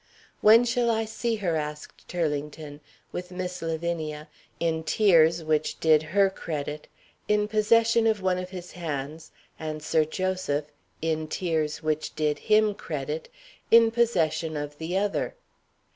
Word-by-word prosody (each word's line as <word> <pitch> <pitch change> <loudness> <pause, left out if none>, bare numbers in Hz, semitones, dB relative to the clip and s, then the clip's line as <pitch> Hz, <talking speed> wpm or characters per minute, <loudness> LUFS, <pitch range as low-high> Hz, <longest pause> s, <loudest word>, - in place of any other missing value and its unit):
_" - - -37 0.4
"When 225 +3 +7
shall 240 0 +1
I 225 -1 +1
see 225 +1 -2
her?" 185 -6 -1
asked 150 -1 -6
Turlington, 150 -3 -3 0.3
with 180 0 -5
Miss 180 0 -5
Lavinia 160 -2 -3 0.3
(in 160 -1 0
tears 165 -3 +4
which 155 -1 0
did 155 -2 +5
her 195 +6 +3
credit) 150 -4 -5 0.4
in 210 0 +2
possession 225 +2 +3
of 220 -2 +2
one 185 -1 0
of 185 0 -6
his 180 -2 -8
hands, 155 -2 -5 0.3
and 155 -1 -5
Sir 155 0 +3
Joseph 160 -3 -2 0.3
(in 160 -1 -1
tears 155 -3 -2
which 155 0 -2
did 150 -1 0
him 215 -1 +3
credit) 155 -4 -5 0.4
in 230 0 +7
possession 170 -9 +1
of 145 0 -6
the 170 +3 -2
other. 205 - -1
165 Hz, 145 wpm, -26 LUFS, 155-205 Hz, 0.4 s, When